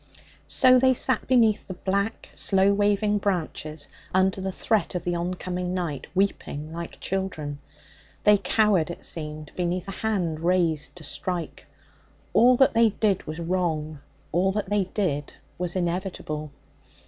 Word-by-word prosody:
So 255 -1 +6
they 260 0 +4
sat 255 -1 +2
beneath 230 -4 +3
the 185 - -6
black, 200 +4 -2
slow 195 0 +3
waving 205 +1 +2
branches 160 -6 -3 0.3
under 190 0 +2
the 190 0 -2
threat 210 0 0
of 175 - -2
the 175 - -1
oncoming 180 +1 -3
night, 165 -7 -3
weeping 160 -5 -1
like 170 0 -7
children. 160 -7 -3 0.6
They 210 -1 +6
cowered, 195 -3 +2
it 170 - -6
seemed, 155 -1 -4
beneath 180 +1 -2
a - - -4
hand 180 -8 0
raised 170 -3 +1
to 175 - -9
strike. 175 +2 -5 0.7
All 245 +1 +6
that 265 - +5
they 230 0 +5
did 205 -2 0
was 155 +2 -5
wrong; 165 -4 -1 0.3
all 185 +4 +2
that 205 -1 -3
they 205 -2 +2
did 170 -7 -2 0.2
was 180 0 -2
inevitable. 175 -4 -3
185 Hz, 145 wpm, -25 LUFS, 165-205 Hz, 0.7 s, So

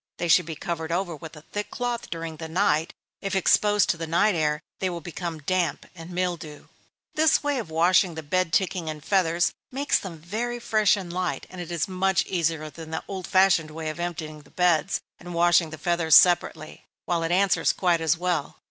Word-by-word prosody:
They 175 - -2
should 170 0 +4
be 160 - -5
covered 165 0 -4
over 175 -1 -1
with 160 +1 -10
a 150 - -13
thick 205 +4 -5
cloth 245 -1 -3
during 165 -1 -5
the 160 - -6
night; 165 -3 +1 0.3
if 195 0 -2
exposed 205 +2 +3
to 170 - -5
the 165 0 -5
night 175 +6 +3
air, 150 -2 0 0.2
they 190 - 0
will 175 -1 -4
become 170 0 -5
damp, 180 -1 0
and 165 -2 -10
mildew. 175 -4 -4 0.5
This 310 0 +3
way 290 -2 0
of 215 - -6
washing 170 +2 +3
the 160 - -6
bed 180 +3 0
ticking 180 -2 0
and 155 -1 -7
feathers, 175 -3 +2 0.2
makes 280 +3 +1
them 180 -4 -8
very 220 +9 -4
fresh 215 -3 +3
and 180 -3 -6
light, 180 -1 -2
and 180 -1 -7
is 170 -2 -2
much 190 0 +1
easier 165 -3 -1
than 160 0 -10
the 160 - -4
old 190 -2 -5
fashioned 185 -4 +3
way 155 0 -5
of 155 - -7
emptying 160 -3 -5
the 145 - -21
beds, 180 0 +1 0.2
and 175 -1 -8
washing 170 -1 +4
the 155 - -8
feathers 165 -1 +3
separately, 175 -3 +3 0.2
while 170 -1 0
it 165 0 -1
answers 190 +1 +3
quite 175 -3 +1
as 160 +1 +2
well. 175 -4 -2
175 Hz, 200 wpm, -25 LUFS, 160-185 Hz, 0.5 s, should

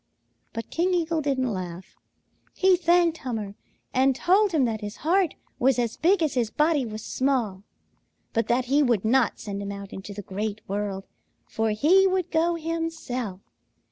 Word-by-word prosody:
But 230 -1 -6
King 360 +2 +1
Eagle 330 -2 0
didn't 260 -5 0
laugh. 180 -1 -7 0.6
He 380 -1 +5
thanked 345 -1 +3
Hummer 220 -6 -4 0.4
and 265 +1 +3
told 390 +7 +3
him 300 -6 +3
that 220 -2 -2
his 210 0 -6
heart 360 0 +2 0.2
was 260 +1 +3
as 235 -2 -1
big 355 +1 +3
as 305 - 0
his 240 -4 0
body 300 0 +1
was 215 0 -7
small, 245 -8 0 0.7
but 230 - 0
that 245 +1 +1
he 280 +4 +3
would 235 -7 +2
not 245 0 +2
send 200 -1 -5
him 200 0 -4
out 200 -1 -8
into 190 +2 -7
the 205 - -6
Great 210 +3 -4
World, 200 -1 -3 0.4
for 220 0 -1
he 330 - +4
would 370 -2 -1
go 335 +2 +2
himself. 320 - -4
255 Hz, 170 wpm, -25 LUFS, 210-330 Hz, 0.7 s, He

